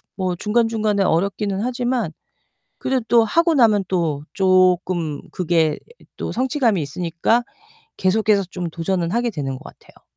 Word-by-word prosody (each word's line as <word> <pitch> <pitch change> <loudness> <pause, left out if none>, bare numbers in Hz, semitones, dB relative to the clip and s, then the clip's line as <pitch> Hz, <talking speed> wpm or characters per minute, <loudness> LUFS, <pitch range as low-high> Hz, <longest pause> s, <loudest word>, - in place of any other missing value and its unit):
뭐 185 -2 -1
중간중간에 215 -1 +1
어렵기는 195 +3 0
하지만 245 -4 -1 0.7
그래도 240 -3 +2
하고 335 +8 +2
나면 215 -6 +4
또 160 -6 -1
쪼끔 185 -5 +2
그게 165 -3 +1 0.4
또 - - -4
성취감이 250 - +1
있으니까 170 - 0 0.5
계속해서 205 +1 +2
좀 175 -2 -4
도전을 170 +2 -2
하게 235 0 0
되는 135 -6 -4
것 - - -14
같아요. - - -16
195 Hz, 295 characters per minute, -21 LUFS, 170-230 Hz, 0.7 s, 나면